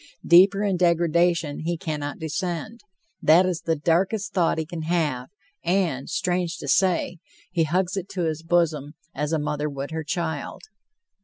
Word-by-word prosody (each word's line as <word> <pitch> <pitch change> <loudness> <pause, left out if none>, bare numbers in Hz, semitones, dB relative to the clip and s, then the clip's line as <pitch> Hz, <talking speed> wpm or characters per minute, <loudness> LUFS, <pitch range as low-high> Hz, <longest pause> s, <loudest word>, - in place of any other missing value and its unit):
Deeper 195 +4 +6
in 195 -3 +1
degradation 170 -2 +2
he 170 +2 -2
cannot 150 -3 -4
descend. 175 +7 -4 0.4
That 170 +4 +6
is 180 -3 -2
the 165 - 0
darkest 190 +7 0
thought 175 -4 +2
he 160 - -2
can 170 0 -6
have, 155 -6 -1 0.3
and, 175 -8 0
strange 180 -2 -1
to 140 - -8
say, 180 +1 +1 0.3
he 170 -3 +1
hugs 180 +4 0
it 195 -1 -4
to 180 -2 -2
his 160 -1 -2
bosom 165 -3 0 0.2
as 150 +2 -2
a 160 - +2
mother 150 0 -2
would 140 +1 -6
her 160 0 -3
child. 160 -1 -4
170 Hz, 160 wpm, -24 LUFS, 155-180 Hz, 0.4 s, Deeper